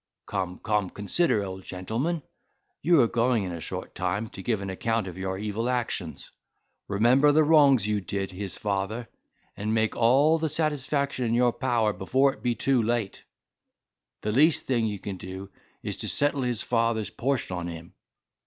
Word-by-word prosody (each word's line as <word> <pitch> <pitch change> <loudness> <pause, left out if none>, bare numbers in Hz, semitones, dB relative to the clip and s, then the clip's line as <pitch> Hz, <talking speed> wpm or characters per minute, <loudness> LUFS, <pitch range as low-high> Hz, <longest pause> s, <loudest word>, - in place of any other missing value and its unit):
Come, 95 -2 -3
come, 105 -3 0
consider, 105 - +1
old 95 -1 -7
gentleman, 115 - -3 0.6
you 170 +1 +4
are 120 - +4
going 115 -1 +1
in 90 - -4
a 85 - -5
short - - -6
time 100 +5 -2
to 95 - -9
give 110 +1 0
an 95 - -4
account 115 +3 -1
of 90 -3 -7
your 95 0 -3
evil 105 +4 -2
actions. 115 -9 -3 0.6
Remember 120 +8 +4
the 155 +2 +4
wrongs 140 -8 +5
you 105 -1 0
did 95 0 -3
his 95 -1 -5
father, 105 +3 -2 0.5
and 105 +2 -2
make 110 0 +1
all 140 +7 +4
the 160 0 0
satisfaction 145 -3 0
in 115 0 +1
your 120 0 +3
power 115 -5 +1
before 135 +9 +2
it - - -17
be 120 -1 0
too 130 +2 +2
late. 115 -3 -2 1.0
The 105 - -1
least 150 +7 +4
thing 120 -4 +1
you 105 -1 -3
can 100 0 -6
do 95 +2 -8 0.3
is - - -3
to - - -1
settle 145 -1 +2
his 125 -3 0
father's 115 -3 0
portion 130 -7 -1
on 90 -1 -4
him." 85 -1 -9
115 Hz, 175 wpm, -26 LUFS, 100-130 Hz, 1.0 s, wrongs